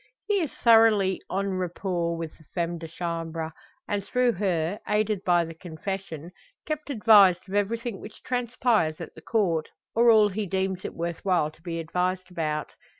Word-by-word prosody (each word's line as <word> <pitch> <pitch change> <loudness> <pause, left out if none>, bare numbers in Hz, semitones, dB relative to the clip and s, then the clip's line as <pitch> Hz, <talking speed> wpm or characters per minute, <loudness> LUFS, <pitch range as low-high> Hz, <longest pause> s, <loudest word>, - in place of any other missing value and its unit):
He 415 -1 +2
is 320 -6 -2
thoroughly 225 -5 +4
en 195 0 -1
rapport 175 -1 -2
with 165 -1 -6
the 160 - -21
femme 170 -1 -1
de 165 - -7
chambre 165 -1 -4 0.4
and 205 -1 -1
through 250 +3 +2
her, 180 -2 -1
aided 210 -2 0
by 175 -2 +3
the 165 - -8
Confession, 170 0 -6 0.3
kept 305 -2 -4
advised 210 -8 +5
of 190 - -9
everything 215 +1 -1
which - - -11
transpires 240 -9 0
at - - -8
the 160 - -13
Court, 170 -7 0 0.2
or 235 +1 +5
all 215 -2 +6
he 205 +1 -3
deems 190 0 -1
it - - -6
worth 170 0 -4
while 175 -6 +2
to 155 - -23
be 165 -1 -4
advised 180 +3 -2
about. 155 -3 -2
185 Hz, 170 wpm, -26 LUFS, 165-215 Hz, 0.4 s, all